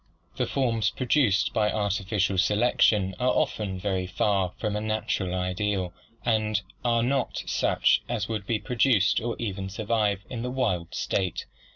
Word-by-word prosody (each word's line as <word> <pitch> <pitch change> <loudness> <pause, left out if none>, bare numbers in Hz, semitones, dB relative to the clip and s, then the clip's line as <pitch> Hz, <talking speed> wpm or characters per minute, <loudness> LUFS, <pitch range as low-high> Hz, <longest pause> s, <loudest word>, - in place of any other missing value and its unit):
The 125 - -1
forms 115 -6 +1
produced 125 -5 +2
by 105 -1 +2
artificial 100 -2 0
selection 105 -1 +3
are 125 - +2
often 100 -6 0
very 95 -1 -1
far 95 0 +1
from 105 -2 -2
a 105 - -1
natural 110 -4 -1
ideal 90 0 -1 0.3
and 110 -2 +1 0.2
are 115 -1 +2
not 135 +1 -1
such - - +2
as 100 - -1
would 110 -3 -4
be 115 - +1
produced 115 -4 +2
or 120 +1 -2
even 95 -4 -4
survive 105 -1 0
in 115 -3 -5
the 125 - -3
wild 105 -10 -1
state. 95 -3 -1
105 Hz, 150 wpm, -26 LUFS, 95-115 Hz, 0.3 s, selection